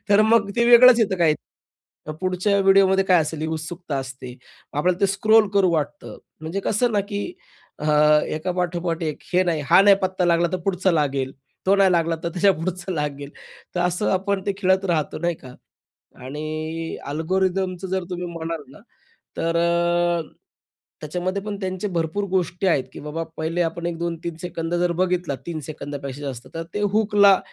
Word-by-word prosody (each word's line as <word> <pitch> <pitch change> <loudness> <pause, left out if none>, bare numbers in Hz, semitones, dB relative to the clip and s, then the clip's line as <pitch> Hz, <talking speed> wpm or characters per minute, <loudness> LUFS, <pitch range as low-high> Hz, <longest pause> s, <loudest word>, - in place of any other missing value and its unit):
तर 205 +1 +5
मग 220 -2 +3
ते 235 - +3
वेगळंच 240 0 +8
येतं 195 -4 +1
काही 160 -3 +4 0.7
मग 155 - -4
पुढच्या 185 +2 +1
व्हिडिओमध्ये 195 0 +4
काय 185 -3 +4
असेल 155 0 -5
ही 155 - -2
उत्सुकता 160 -1 -5
असते. 130 -2 -7 0.4
आपल्याला 175 +5 0
ते 200 - +4
स्क्रोल 215 +1 +4
करू 195 -2 +4
वाटतं. 150 -2 -3 0.2
म्हणजे 160 +5 -4
कसं 225 +4 +1
ना, 205 - +2
की 200 0 -4 0.6
अ, 150 - -4 0.5
एकापाठोपाठ 175 0 -2
एक 155 -2 -3
हे 180 +1 +4
नाही 165 -4 0
हा - - +8
नाही 200 -1 +7
पत्ता 185 -1 0
लागला, 170 0 +3
तर 185 - 0
पुढचा 190 -1 +1
लागेल. 140 -4 0 0.3
तो 195 - +5
नाही 195 -2 +4
लागला 165 -1 +1
तर - - +1
त्याच्यापुढचं 185 0 0
लागेल. 145 -3 -4 0.4
तर 175 - 0
असं 180 +3 0
आपण 195 +1 0
ते 200 - +1
खेळत 190 -1 +2
राहतो, 160 -5 -1
नाही 170 +1 -1
का? 130 -3 -13 0.7
आणि 155 +3 -5
अल्गोरिथमचं 185 +4 -1
जर 190 0 -1
तुम्ही 180 -1 -4
म्हणाल 165 -1 -5
ना - - -15 0.6
तर 165 0 -1
अ, 170 0 +2 0.8
त्याच्यामध्ये 180 +5 -3
पण 210 -1 -4
त्यांचे 185 +2 -3
भरपूर 165 +4 -1
गोष्टी 185 0 0
आहेत, 145 -7 +2
की - - -9
बाबा 160 +2 -3
पहिले 165 +2 -1
आपण 170 +1 -6
1-2-3 170 0 -4
सेकंद 170 -1 -4
जर 175 0 +1
बघितला, 180 -5 0
3 165 -2 -3
सेकंदापेक्षा 145 -2 -6
जास्त, 130 -4 -6
तर 165 - -3
ते 205 - -2
हुकला 205 -3 +5
175 Hz, 170 wpm, -22 LUFS, 160-190 Hz, 0.8 s, वेगळंच